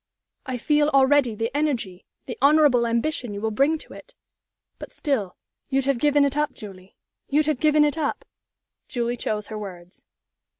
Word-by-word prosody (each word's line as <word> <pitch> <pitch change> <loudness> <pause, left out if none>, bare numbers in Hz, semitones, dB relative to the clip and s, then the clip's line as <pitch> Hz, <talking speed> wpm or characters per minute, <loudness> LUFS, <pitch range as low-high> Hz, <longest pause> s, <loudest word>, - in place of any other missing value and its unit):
"I 255 -1 -3
feel 295 +4 +2
already 275 -4 +3
the 230 +5 -3
energy, 245 -12 -2 0.2
the - - -6
honorable 280 -5 +4
ambition 235 -1 -2
you - - -5
will 220 +1 -2
bring 280 +8 +2
to - - -14
it. - - -14 0.6
But - - -9
still, 235 - -2 0.3
you'd 270 -1 0
have 275 -3 +1
given 290 0 +3
it 280 0 -1
up, 300 0 0
Julie? 190 -2 -12 0.3
You'd 300 +2 +2
have 305 -4 -1
given 305 -1 +4
it 295 +2 -1
up?" 290 - -2 0.6
Julie 240 0 -2
chose 210 -3 -3
her 215 -1 -5
words. 180 -3 -10
265 Hz, 170 wpm, -24 LUFS, 220-295 Hz, 0.6 s, honorable